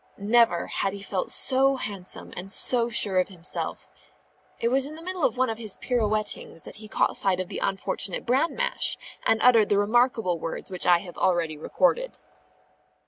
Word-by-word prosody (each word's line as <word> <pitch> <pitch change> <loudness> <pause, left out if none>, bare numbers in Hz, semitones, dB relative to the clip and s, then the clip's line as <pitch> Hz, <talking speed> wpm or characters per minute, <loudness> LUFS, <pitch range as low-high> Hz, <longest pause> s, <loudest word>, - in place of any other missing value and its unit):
Never 210 -4 +2
had 195 - -2
he 200 0 -8
felt 190 -2 -3
so 270 +1 +4
handsome 200 -7 -6
and 185 +2 -7
so 240 +2 +3
sure 200 -5 +3
of 185 - +1
himself. 180 -3 -4 0.7
It 235 - 0
was 270 +2 +2
in 305 - -9
the 320 - -10
middle 365 -2 -5
of - - +1
one 255 0 +2
of 225 - -7
his 215 -4 -1
pirouettings, 215 -7 -2
that - - -10
he 215 0 -10
caught - - 0
sight 190 -2 +3
of 185 - -4
the - - -5
unfortunate 195 -1 -2
bran 265 +7 +1
mash, - - -1 0.3
and 225 - +3
uttered 230 -4 +5
the 205 - +2
remarkable 220 -4 +1
words 165 +4 -6
which 180 -1 -1
I 175 -1 +6
have 175 - -10
already 170 -4 0
recorded. 375 - 0
215 Hz, 185 wpm, -25 LUFS, 185-250 Hz, 0.7 s, I